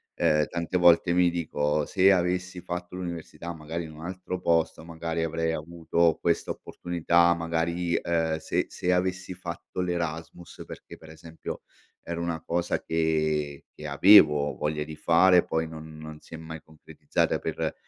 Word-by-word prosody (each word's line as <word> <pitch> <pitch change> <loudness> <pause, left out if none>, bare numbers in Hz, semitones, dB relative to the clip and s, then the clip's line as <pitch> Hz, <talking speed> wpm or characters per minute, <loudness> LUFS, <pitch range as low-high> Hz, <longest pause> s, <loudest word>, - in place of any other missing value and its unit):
Ehm, 75 0 +3
tante 85 +1 -2
volte 85 0 +5
mi 90 0 +4
dico: 75 -3 -1
"Se 95 0 +4
avessi 90 0 0
fatto 90 0 -6
l'università 85 -1 -6
magari 80 +1 -5
in 80 - -10
un 80 +2 -10
altro 90 0 -5
posto, 85 -2 0
magari 80 0 -3
avrei 80 0 -1
avuto 85 +1 0
questa - - 0
opportunità, 85 0 +1
magari, 85 +1 -1
ehm, 80 -2 0
se 80 - -1
se 90 +1 -1
avessi 90 0 -1
fatto 90 0 -6
l'Erasmus", 85 -1 -4
perché - - -10
per 80 - -15
esempio, 80 +1 -8 0.4
era 85 0 -5
una 85 -2 -3
cosa 85 +1 -1
che 75 -3 -1
che 75 - -7
avevo 75 -2 +6
voglia 75 0 -2
di 80 +1 -8
fare, 90 +3 +5
poi 80 0 -1
non 80 -1 -10
non 80 0 -9
si 80 - -11
è - - -7
mai 80 0 -8
concretizzata 80 0 -2
per - - -3
85 Hz, 155 wpm, -27 LUFS, 80-90 Hz, 0.4 s, avevo